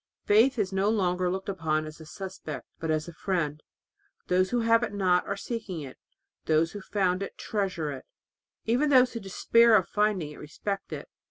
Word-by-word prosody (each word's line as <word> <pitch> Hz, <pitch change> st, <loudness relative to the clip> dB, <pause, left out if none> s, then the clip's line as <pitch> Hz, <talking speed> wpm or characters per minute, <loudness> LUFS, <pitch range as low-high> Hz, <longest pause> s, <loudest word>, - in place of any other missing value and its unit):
Faith 235 Hz, +6 st, +5 dB
is 195 Hz, -3 st, -1 dB
no 195 Hz, +2 st, +2 dB
longer 180 Hz, -4 st, +1 dB
looked 190 Hz, +1 st, -3 dB
upon 160 Hz, -5 st, -1 dB
as 155 Hz, +1 st, -10 dB
a 160 Hz, -, -11 dB
suspect 185 Hz, -4 st, -7 dB
but 160 Hz, -, -3 dB
as 155 Hz, 0 st, 0 dB
a 170 Hz, -, -8 dB
friend. 155 Hz, -4 st, -2 dB, 0.7 s
Those 185 Hz, +1 st, +3 dB
who 245 Hz, -1 st, +1 dB
have 230 Hz, 0 st, +4 dB
it 235 Hz, -4 st, -2 dB
not 180 Hz, -3 st, +2 dB
are 200 Hz, -, -2 dB
seeking 210 Hz, -7 st, -5 dB
it, 135 Hz, -3 st, -9 dB, 0.4 s
and -, -, -41 dB
those 160 Hz, +1 st, +3 dB
who 205 Hz, -, -6 dB
have 190 Hz, -, -14 dB
found 185 Hz, -2 st, +1 dB
it 195 Hz, -, -6 dB
treasure 185 Hz, -8 st, -2 dB
it. 135 Hz, -, -8 dB, 0.6 s
Even 250 Hz, +7 st, +2 dB
those 255 Hz, -2 st, +5 dB
who 230 Hz, -, -3 dB
despair 230 Hz, +3 st, +4 dB
of 185 Hz, -5 st, +3 dB
finding 205 Hz, -7 st, 0 dB
it -, -, -11 dB
respect 195 Hz, +6 st, -5 dB
it. -, -, -6 dB
190 Hz, 200 wpm, -28 LUFS, 165-210 Hz, 0.7 s, Faith